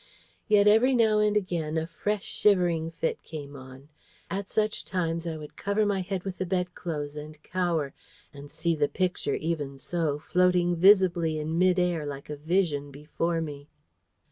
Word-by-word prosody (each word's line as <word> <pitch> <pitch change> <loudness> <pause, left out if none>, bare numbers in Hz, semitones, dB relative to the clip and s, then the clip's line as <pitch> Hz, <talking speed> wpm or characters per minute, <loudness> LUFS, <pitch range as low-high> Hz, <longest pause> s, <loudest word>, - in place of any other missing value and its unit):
Yet 210 -2 +5
every 235 +5 +5
now 220 -3 +4
and 210 0 +3
again 165 -5 -2
a 160 - 0
fresh 205 +4 -3
shivering 175 -5 +2
fit 165 0 -3
came 145 -3 -8
on. 130 +1 -12 0.4
At 195 0 -3
such 215 -1 0
times 170 -2 -2
I 160 -1 -3
would 150 -1 -10
cover 200 +2 0
my 200 -2 0
head 185 0 -4
with 190 -2 -6
the 185 - -1
bedclothes 175 -5 -3
and 150 +1 -8
cower, 170 -6 -1 0.4
and 145 0 -10
see 160 +3 -1
the 150 -2 +1
Picture 180 -6 -1
even 150 -4 -3
so 155 +1 -1
floating 180 +2 +2
visibly 175 -3 +4
in 155 +2 -2
mid 185 0 +4
air 175 -3 +1
like 140 +1 -7
a - - -3
vision 150 -2 0
before 160 +4 -2
me. 145 -2 -7
170 Hz, 170 wpm, -27 LUFS, 150-185 Hz, 0.4 s, Yet